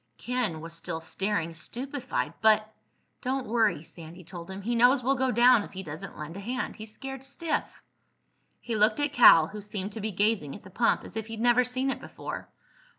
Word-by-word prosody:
Ken 240 -10 -2
was 165 +1 -8
still 165 0 -3
staring, 170 0 -1
stupefied. 255 - -3
"But—" 215 -1 +5 0.5
"Don't 260 0 -1
worry," 215 -8 +1
Sandy 170 +2 -12
told 170 0 -9
him. 190 +1 -7
"He 240 +4 -1
knows 245 +3 +5
we'll 270 +3 +3
go 265 -1 +1
down 245 0 +6
if - - -9
he 190 0 -6
doesn't 150 -2 -8
lend 155 +2 -7
a - - -6
hand. 245 +5 -3
He's 215 -1 -8
scared 270 +3 -7
stiff." 305 +4 -3 0.8
He 235 - -4
looked 215 +4 +3
at 290 0 0
Cal, 165 - +8
who 210 0 -7
seemed 205 -1 -5
to 220 - -6
be 215 - -2
gazing 200 -7 0
at 205 - -12
the 190 - -13
pump 230 +5 +2
as - - -11
if 220 -1 -4
he'd 225 -1 -7
never 240 +1 +4
seen 255 +2 -1
it - - -5
before. - - -7
220 Hz, 205 wpm, -28 LUFS, 185-250 Hz, 0.8 s, Cal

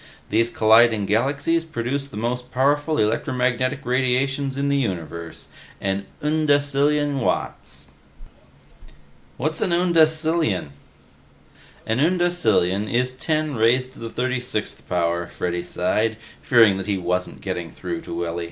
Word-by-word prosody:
These 115 +2 +2
colliding 110 -1 +4
galaxies 140 +10 +1
produce 140 -2 -3
the 135 - -10
most 125 +3 -3
powerful 145 +4 +1
electromagnetic 125 +4 0
radiations 130 +2 0
in 140 0 0
the 140 0 +2
universe 85 - -4 0.3
an 100 0 -2 0.2
undecillion 145 -1 +2
watts!" 125 - -3 1.5
"What's 155 +4 -2
an - - +1
undecillion?" 160 - +2 1.2
"An 110 +3 0
undecillion 140 - +2
is 125 +1 +1
ten 155 +3 -1
raised 125 +3 +2
to - - -14
the 115 - -6
36th 125 -3 -3
power," 85 -1 0
Freddy 90 0 -3
sighed, 105 +5 0 0.2
fearing 110 -6 +5
that 95 0 -5
he 100 -2 0
wasn't 90 0 -2
getting 90 -3 -4
through 85 +1 -5
to - - -8
Willy. 85 0 -3
125 Hz, 120 wpm, -22 LUFS, 100-145 Hz, 1.5 s, fearing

